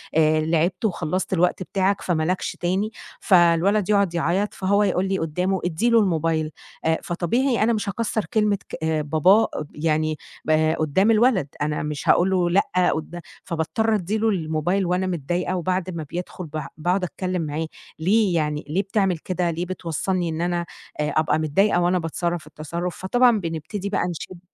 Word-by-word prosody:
آآ 155 0 +4
لعبت 170 +5 0
وخلصت 185 -1 -1
الوقت 180 +1 +1
بتاعك 195 +1 0
فما 165 -3 0
لكش 180 +3 -1
تاني، 190 +5 0 0.3
فالولد 180 +3 +3
يقعد 200 -4 +3
يعيط، 175 +5 0
فهو 200 +2 +2
يقول 190 -1 +1
لي 190 0 0
قدّامه 180 +4 -1
ادّي 180 +8 +1
له 230 -1 +5
الموبيل. 165 -4 +1 0.3
آآ، 160 0 +3
فطبيعي 230 +8 0
أنا 235 +2 +3
مش 210 -2 -2
هاكسر 220 +1 -2
كلمة 210 -2 +1
ك - - -5
آآ، 160 -1 +1
باباه 180 +9 +4
آب 150 - -4
يعني 155 0 0 0.3
آآ، 155 +1 +3
قدّام 180 +8 +2
الولد، 220 - +3
أنا 150 0 -1
مش 150 -2 -4
هاقول 180 +2 +5
له 180 -2 +2
لأ 185 -1 +2
قدا 170 +2 -6 0.2
فباضطر 200 +7 0
أدي 205 +3 -1
له 225 +1 +2
الموبيل 175 +1 0
وأنا 180 +1 0
متضايقة، 175 +2 -2
وبعد 185 +1 -1
ما 160 - -4
بيدخل 180 0 -5
ب 155 0 -5 0.2
باقعد 180 +4 0
أتكلم 180 0 -2
معاه، 155 +1 -3 0.3
ليه 195 +2 +2
يعني؟ 150 -2 -1
ليه 185 +6 +1
بتعمل 195 -3 0
كده؟ 175 +1 -1
ليه 170 +2 -3
بتوصلني 180 0 -2
إن 160 0 -3
أنا 175 0 -1 0.3
آآ، 150 0 0
أبقى 155 0 +2
متضايقة 175 +4 +2
وأنا 180 +1 +2
باتصرف 170 0 -3
التصرف؟ 170 +4 -5
فطبعًا 240 +3 +3
بنبتدي 170 +4 -4
بقى 185 -3 0
نشد 175 +1 -7
175 Hz, 170 wpm, -23 LUFS, 160-195 Hz, 0.3 s, له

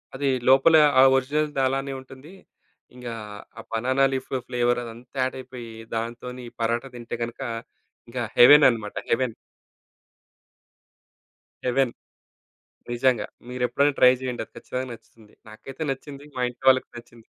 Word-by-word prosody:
అది 140 +1 -1 0.2
లోపల 135 +5 +6 0.2
ఆ - - +9
ఒరిజినల్‌ది 145 +2 0
అలానే 135 +1 -2
ఉంటుంది. 135 +4 -14 0.6
ఇంగా 125 -2 -7 0.5
ఆ - - -6
బనానా 130 +4 +1
లీఫ్ 130 0 -4 0.2
ఫ్లేవరదంతా 120 0 -2
యాడయిపోయి, 130 -2 -6 0.2
దాంతోని 120 +2 -5
పరటా 115 +3 -1
తింటే 120 -1 -6
గనక, 120 +2 -6 0.7
ఇంకా 120 0 -3
హెవెనన్నమాట 120 -5 +6 0.2
హెవెన్. 120 -1 +1 2.3
హెవెన్ 125 -1 +1 1.0
నిజంగా. 120 -3 +2 0.2
మీరు 125 0 -3
ఎప్పుడైనా 140 +4 +2
ట్రై 125 - +8
జేయండి. 125 -2 -3
అది - - -37
ఖచ్చితంగా 130 +1 -4
నచ్చుతుంది. 115 -2 -15 0.2
నాకైతే 135 +6 -11
నచ్చింది. 140 +1 -8
మా 130 - -3
ఇంట్లో 125 +2 -7
వాళ్ళకి 130 0 +3
నచ్చింది. 120 -1 -14
125 Hz, 115 wpm, -24 LUFS, 120-135 Hz, 2.3 s, ఆ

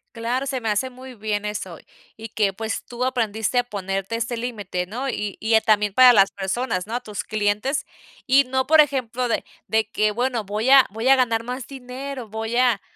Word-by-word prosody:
Claro, 240 +4 -2
se 265 -2 -2
me 225 - -5
hace 210 +5 0
muy 255 +1 -11
bien 210 -1 -3
eso, 190 -5 -5 0.4
y 225 +1 -7
que 205 -1 +1
pues 220 +3 -4
tú 245 +1 -4
aprendiste 230 -2 0
a - - +2
ponerte 195 -1 -3
este 235 +1 -2
límite, 205 -7 -4
¿no?, 245 +8 -5
y 210 -4 -4
y, 220 +1 0
eh, 220 - +6
también 210 -2 +2
para 255 +2 +8
las 195 -4 +5
personas, 195 0 -2
¿no?, 225 +3 -5
a - - 0
tus 210 -5 -6
clientes. 215 +6 -1 0.4
Y 275 +1 +6
no 260 0 -1
por 315 0 +7
ejemplo, 255 -4 -1
de - - -1 0.2
de 220 -1 +1
que: 215 -1 +1
"Bueno, 245 0 -1
voy 210 +5 -2
a 270 -2 +8
voy 225 +5 -3
a 270 - +7
ganar 230 -3 +1
más 250 +1 -5
dinero, 260 -1 -7
voy 220 +2 -3
a 245 -6 +3
230 Hz, 210 wpm, -23 LUFS, 210-255 Hz, 0.4 s, para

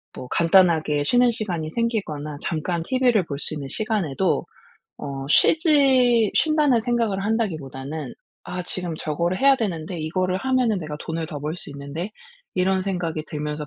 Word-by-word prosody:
뭐 125 - -7
간단하게 165 -4 +3
쉬는 245 +6 +4
시간이 180 -9 -3
생기거나 160 -11 -2
잠깐 170 +1 -2
TV를 245 -3 +2
볼 140 -3 -5
수 - - -3
있는 140 -2 -5
시간에도 190 -3 0 0.5
어 135 -1 -5
쉬지 260 - +4
쉰다는 300 -6 +3
생각을 230 -4 0
한다기보다는 155 - -3 0.3
'아 180 0 -4
지금 180 -2 -4
저거를 170 +4 -1
해야 275 0 +5
되는데. 175 -6 -3
이거를 185 +4 -1
하면은 255 -2 +1
내가 155 -3 -6
돈을 160 0 -3
더 150 -2 -6
벌 155 +3 -3
수 175 - -5
있는데.' 140 +7 -6 0.5
이런 190 +1 +2
생각이 175 -5 -2
들면서 150 -1 -4
180 Hz, 340 characters per minute, -23 LUFS, 155-225 Hz, 0.5 s, 해야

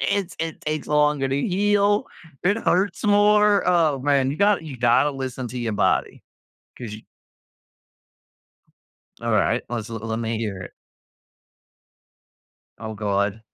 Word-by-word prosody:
It's 195 -3 -1
it 165 -1 -4
takes 155 0 -3
longer 150 -2 +2
to 135 +1 0
heal. 205 +1 +2 0.4
It 200 +4 +3
hurts 200 -1 0
more. 210 0 +4
Oh, 165 -6 +3
man. 135 -1 +2
You 145 - -4
gotta 200 -3 +2
you 140 -4 -7
gotta 125 +4 +3
listen 130 -2 -5
to 125 - -6
your 115 -2 -2
body. 105 - 0 0.6
'Cause 115 -4 -7
you 110 - -11 2.2
Alright. - - +1
Let's 115 -3 -4
l 115 - -6
let 110 +1 -4
me 115 0 -2
hear 105 -4 -4
it. - - -10 2.1
Oh 110 0 -6
god. 100 +1 -1
140 Hz, 135 wpm, -23 LUFS, 115-190 Hz, 2.2 s, more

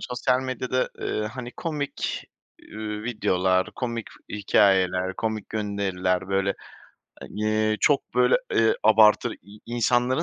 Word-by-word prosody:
sosyal 125 0 0
medyada, 130 0 -2
eee, - - -2
hani, 120 -1 -6
komik, 150 -4 -3 0.5
ııı, 105 -1 -5
videolar, 95 -5 +1
komik 115 -3 -4 0.2
hikâyeler, 95 -2 +2
komik 110 -2 -3
gönderiler, 95 -3 -1
böyle, 100 0 +1 0.7
hani, 110 0 0
çok, 145 -2 +2
böyle, 125 - +4 0.2
eee, 115 0 +4
abartır 110 0 +5
i 100 +4 -15
insanların 120 +2 +1
110 Hz, 110 wpm, -25 LUFS, 100-125 Hz, 0.7 s, abartır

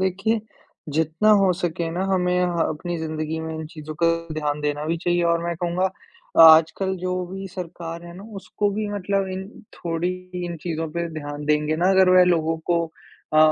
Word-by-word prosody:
देखिए, 195 +4 0 0.5
जितना 160 +7 +2
हो 190 -2 +4
सके 170 -1 -2
ना, 180 +3 -2
हमें 180 -2 +1
ह 175 -1 -1
अपनी 170 +3 -4
ज़िंदगी 155 0 -3
में 160 0 -5
इन 160 -1 -5
चीज़ों 155 -1 -9
का - - +6 0.3
ध्यान 150 -1 -2
देना 150 0 -2
भी 165 +1 0
चाहिए। 175 0 0
और 170 0 +1
मैं 170 0 -1
कहूँगा, 175 +2 0 0.6
आजकल 160 +4 +6
जो 185 0 -1
भी 195 +1 -6
सरकार 170 -2 -7
है 170 - -10
ना, 195 - -10
उसको 200 +2 -2
भी 210 +1 -2
मतलब 195 0 -1
इन 190 +1 -5 0.3
थोड़ी 170 +1 -2 0.4
इन 170 -1 -4
चीज़ों 165 -2 -3
पे 170 0 -2
ध्यान 145 -1 -6
देंगे 150 +1 +1
ना, 180 +3 +3
अगर 190 -1 +5
वह 185 0 +7
लोगों 165 -2 +1
को 170 -1 +3 0.5
अ, 155 - +4
170 Hz, 185 wpm, -23 LUFS, 160-185 Hz, 0.6 s, वह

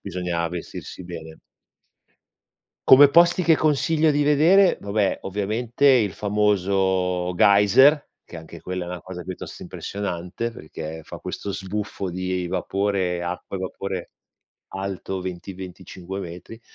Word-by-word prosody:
bisogna 85 -2 -2
vestirsi 90 +1 -7
bene. 80 -2 -9 1.5
Come 140 +2 +9
posti 170 +3 +5
che 165 - +6
consiglio 155 +1 +2
di 145 0 +2
vedere, 170 +6 +5
vabbè, 100 0 0
ovviamente 110 +7 -1
il 120 -8 +5
famoso 95 -3 +1
Geyser, 105 - +5 0.2
che - - -11
anche 80 0 -11
quella 90 -1 -4
è - - -9
una 90 -1 -6
cosa 95 -1 -8
piuttosto 90 +1 -8
impressionante, 95 +2 -4
perché 80 -5 -8
fa - - -9
questo 100 - -5
sbuffo 100 -1 -4
di 90 0 -3
vapore 95 -1 -1
acqua 90 +2 -5
e - - -6
vapore 95 -1 -5 0.6
alto 95 -1 -5
20-25 95 0 -7
metri. 90 +6 -9
95 Hz, 120 wpm, -23 LUFS, 90-105 Hz, 1.5 s, Come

